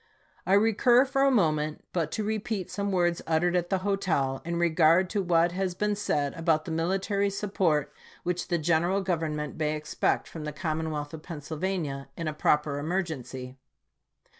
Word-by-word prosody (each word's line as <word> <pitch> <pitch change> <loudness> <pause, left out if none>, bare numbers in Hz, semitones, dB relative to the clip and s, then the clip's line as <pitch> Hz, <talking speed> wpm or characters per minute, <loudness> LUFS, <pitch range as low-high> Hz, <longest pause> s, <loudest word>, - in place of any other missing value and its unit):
I 190 - +3
recur 225 +5 +5
for 270 0 0
a 275 - +5
moment 155 - +1
but 165 -3 -1
to 215 - -1
repeat 215 -2 -2
some 200 0 -2
words 175 -2 +1
uttered 170 +2 +2
at 175 -1 0
the 190 - +2
hotel, 160 -10 0
in 170 +1 -3
regard 170 +1 +4
to 205 - 0
what 170 -1 +3
has 185 0 -2
been 210 +2 0
said 145 -8 -1
about 165 -2 +1
the 170 - -5
military 195 +5 0
support 190 -7 0 0.3
which 180 0 -2
the 175 - +1
general 170 +4 +1
Gov 180 -4 +1
ernment 150 -2 -3
may 155 -1 0
expect 150 0 -1
from 160 - -8
the 150 -1 -4
commonwealth 155 -2 -3
of 160 - -7
Pennsyl 155 -2 -7
vania 155 -8 -2
in 165 - -3
a 155 - -1
proper 150 -1 +1
emergency. 145 -6 -4
170 Hz, 175 wpm, -28 LUFS, 155-195 Hz, 0.3 s, recur